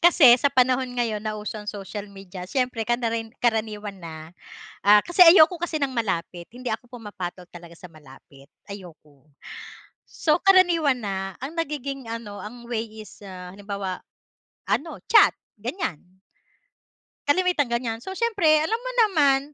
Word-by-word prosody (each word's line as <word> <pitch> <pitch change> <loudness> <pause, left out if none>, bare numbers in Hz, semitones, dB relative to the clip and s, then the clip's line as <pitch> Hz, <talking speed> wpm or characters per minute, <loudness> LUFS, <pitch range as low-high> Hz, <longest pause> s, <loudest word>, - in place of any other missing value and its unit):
Kasi 285 -8 +8
sa 280 +3 +1
panahon 255 0 +2
ngayon 235 -4 -1
na 215 -1 -3
uso 210 +1 -6
ang 210 0 -8
social 205 0 -7
media 190 -2 -9
siyempre 250 +2 -2
kanarin 230 -1 -2
karaniwan 215 -3 -1
na, 165 -3 -9 0.7
ah 205 +1 +6
kasi 350 - -8
ayoko 335 0 +7
kasi 345 -2 -3
ng 275 - 0
malapit. 180 -7 -3
Hindi 245 0 -5
ako 245 +2 -5
pumapatol 205 -7 -7
talaga 170 -1 -12
sa 180 0 -13
malapit, 140 -2 -17 0.2
ayoko. 155 -7 -13 0.8
So 315 +2 0
karaniwan 335 - +4
na, 195 -2 -4
ang 275 +5 -7
nagiging 275 -6 -4
ano 220 -3 -7
ang 235 +3 -10
way 230 -2 -3 0.2
is 205 - -17
ah 185 -2 -9
halimbawa, 200 -2 -5 0.7
ano 325 +3 -1
chat - - +7 0.3
ganyan. 190 - -5 1.1
Kalimitan 350 -4 +2
ganyan, 235 -1 -2
so - - -7
siyempre 430 -9 +2
alam 315 +9 0
mo - - -4 0.2
naman 285 -8 +3
225 Hz, 145 wpm, -24 LUFS, 195-275 Hz, 1.1 s, Kasi